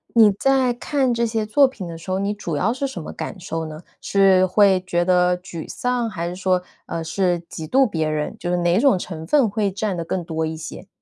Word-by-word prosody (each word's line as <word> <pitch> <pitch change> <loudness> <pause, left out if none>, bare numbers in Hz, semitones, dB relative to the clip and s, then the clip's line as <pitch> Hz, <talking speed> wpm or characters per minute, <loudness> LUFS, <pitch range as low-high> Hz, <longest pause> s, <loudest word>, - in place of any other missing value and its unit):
你 220 -3 +7
在 260 +3 +2
看 260 0 0
这 235 0 +1
些 220 -1 -1
作 275 +5 +5
品 200 -9 -8
的 165 - -7
时 165 +3 -11
候 185 - 0
你 200 +1 -1
主 175 -7 -4
要 205 +10 +1
是 275 +2 -2
什 225 -10 -7
么 - - -7
感 195 - -6
受 165 -2 -4
呢？ 155 +1 -9 0.2
是 195 -2 +4
会 190 -1 +4
觉 175 -1 +1
得 180 -1 +3
沮 180 -3 -8
丧？ 245 -2 -1
还 170 -3 -4
是 175 - -5
说， 185 -1 +1 0.2
呃， 165 - -3
是 175 +1 0
嫉 160 -1 -7
妒 265 - +4
别 160 -5 -1
人？ 150 -1 -2
就 175 - -4
是 180 - +1
哪 175 +3 +2
种 270 -7 +4
成 165 -3 -6
分 275 -1 +4
会 205 -1 0
占 200 -1 -2
得 170 - -3
更 180 +1 -3
多 160 -1 -2
一 160 0 -5
些？ 165 +4 -8
185 Hz, 255 characters per minute, -22 LUFS, 170-220 Hz, 0.2 s, 你